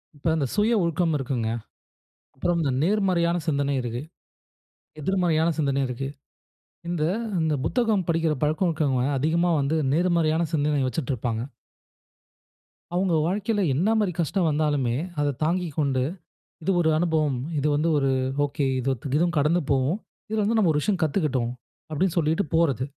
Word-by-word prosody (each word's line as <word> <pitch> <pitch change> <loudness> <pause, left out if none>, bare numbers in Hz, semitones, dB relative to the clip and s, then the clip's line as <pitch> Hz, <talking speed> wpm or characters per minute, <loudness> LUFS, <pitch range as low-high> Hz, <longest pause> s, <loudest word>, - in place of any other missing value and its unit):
இப்ப 145 +3 -5
அந்த 145 -4 0
சுய 215 +3 +3
ஒழுக்கம் 170 -1 +1
இருக்குங்க. 125 -4 -2 0.9
அப்புறம் 175 +5 0
இந்த 140 -4 +1
நேர்மறையான 180 -3 +2
சிந்தனை 140 -2 +1
இருக்கு. 120 +1 -4 1.0
எதிர்மறையான 170 -2 +1
சிந்தனை 140 -2 +1
இருக்கு. 135 +2 -4 0.8
இந்த 170 -3 -1 0.4
இந்த 155 -2 +1
புத்தகம் 220 -7 +1
படிக்கிற 165 -1 +2
பழக்கம் 155 +4 +1
இருக்குறவங்க 140 -6 0
அதிகமா 170 +5 +1
வந்து 145 +4 0 0.2
நேர்மறையான 170 -2 +2
சிந்தனை 145 -1 +1
வச்சிட்டுருப்பாங்க. 125 -4 -2 1.5
அவுங்க 185 -1 +1
வாழ்க்கையில 205 +2 0
என்ன 200 +9 +2
மாரி 200 -4 +1
கஷ்டம் 170 +2 +1
வந்தாலுமே, 145 -5 +1 0.3
அத 145 -1 +1
தாங்கிக்கொண்டு, 155 -6 0 0.6
இது 195 - +1
ஒரு 160 - +2
அனுபவம். 155 -5 +1 0.2
இது 150 - 0
வந்து 160 +3 +1
ஒரு 135 -1 +1 0.4
ஒகே. 140 -1 -1
இதுவும் 140 +7 0
கடந்து 160 +5 +3
போகும். 140 - +1 0.3
இதுல 215 -1 +1
வந்து, 225 +2 +1
நாம 175 -6 +4
ஒரு 150 - +1
விஷயம் 190 -1 0
கத்துக்கிட்டோம். 140 -7 0 0.4
அப்பிடின்னு 180 +3 0
சொல்லிட்டு 160 +4 +2
போறது. 140 -7 +2
155 Hz, 135 wpm, -25 LUFS, 140-175 Hz, 1.5 s, நாம